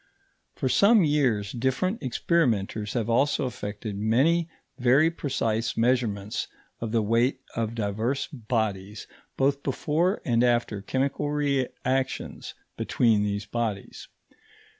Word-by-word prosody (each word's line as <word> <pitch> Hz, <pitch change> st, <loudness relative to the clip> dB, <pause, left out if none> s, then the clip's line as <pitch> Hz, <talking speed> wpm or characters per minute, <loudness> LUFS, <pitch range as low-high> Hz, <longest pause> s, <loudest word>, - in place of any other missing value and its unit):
For -, -, -1 dB
some 200 Hz, -, +5 dB
years 125 Hz, -9 st, +1 dB
different 130 Hz, -, -1 dB
experimenters 115 Hz, -, 0 dB
have 115 Hz, -3 st, -1 dB
also 135 Hz, +5 st, +2 dB
effected 105 Hz, -3 st, -5 dB
many 145 Hz, +11 st, +2 dB, 0.3 s
very 135 Hz, +6 st, +4 dB
precise 115 Hz, -7 st, -1 dB
measurements 115 Hz, -4 st, 0 dB, 0.3 s
of 115 Hz, -2 st, -4 dB
the 115 Hz, -1 st, +2 dB
weight 120 Hz, +5 st, +1 dB
of 115 Hz, 0 st, -2 dB
divers 110 Hz, +5 st, -1 dB
bodies 110 Hz, -5 st, -2 dB, 0.3 s
both 140 Hz, +1 st, +2 dB
before 160 Hz, -, 0 dB
and 120 Hz, -1 st, +2 dB
after 120 Hz, -4 st, +1 dB
chemical 135 Hz, +6 st, -1 dB
reactions 135 Hz, -2 st, -2 dB, 0.2 s
between 115 Hz, -4 st, +2 dB
these 100 Hz, 0 st, -2 dB
bodies. 110 Hz, -3 st, -4 dB
120 Hz, 110 wpm, -26 LUFS, 110-140 Hz, 0.3 s, some